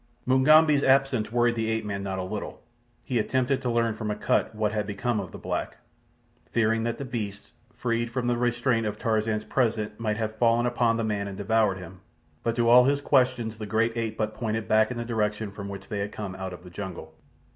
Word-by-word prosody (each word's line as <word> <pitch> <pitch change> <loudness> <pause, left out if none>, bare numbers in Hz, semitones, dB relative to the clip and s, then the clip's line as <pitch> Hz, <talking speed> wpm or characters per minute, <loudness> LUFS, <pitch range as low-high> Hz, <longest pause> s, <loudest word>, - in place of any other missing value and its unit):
Mugambi's 145 +3 +5
absence 135 -5 +3
worried 120 0 +3
the 110 -1 -1
ape 110 -1 -1
man 100 -1 -3
not 95 -1 -3
a 95 - -2
little. 105 +3 -6 0.4
He 125 -3 -1
attempted 130 +4 0
to 125 - -1
learn 115 -1 +1
from 110 0 -4
Akut 105 +1 0
what 105 -1 0
had 105 -2 -2
become 110 +2 -1
of 95 -4 -6
the - - -8
black, - - -4 0.7
fearing 115 -1 +2
that 115 0 -2
the 140 - -5
beasts, 105 -5 -5 0.2
freed 120 -1 -1
from 120 +1 -2
the 120 0 +2
restraint 120 -1 +1
of 105 0 -4
Tarzan's 110 -1 0
presence, 110 -4 0
might 110 -2 -1
have 110 -1 -3
fallen 115 +1 +3
upon 120 -2 +2
the 115 - -1
man 105 -2 -1
and 100 -1 -7
devoured 105 -1 +2
him; 90 0 -10 0.4
but 115 0 -1
to 120 -1 +2
all 125 +1 +8
his 140 +1 +2
questions 125 -5 +1
the 105 - -5
great 115 +2 +1
ape 115 -1 -3
but 110 0 -1
pointed 110 -1 -3
back 110 0 +4
in 125 - -5
the 120 - -3
direction 105 -2 -1
from 100 0 -7
which 100 -1 -8
they 105 -3 -3
had 100 +1 -3
come 100 -3 -5
out 95 0 -5
of 90 -1 -10
the 90 - -12
jungle. 85 -4 -7
110 Hz, 220 wpm, -26 LUFS, 105-120 Hz, 0.7 s, all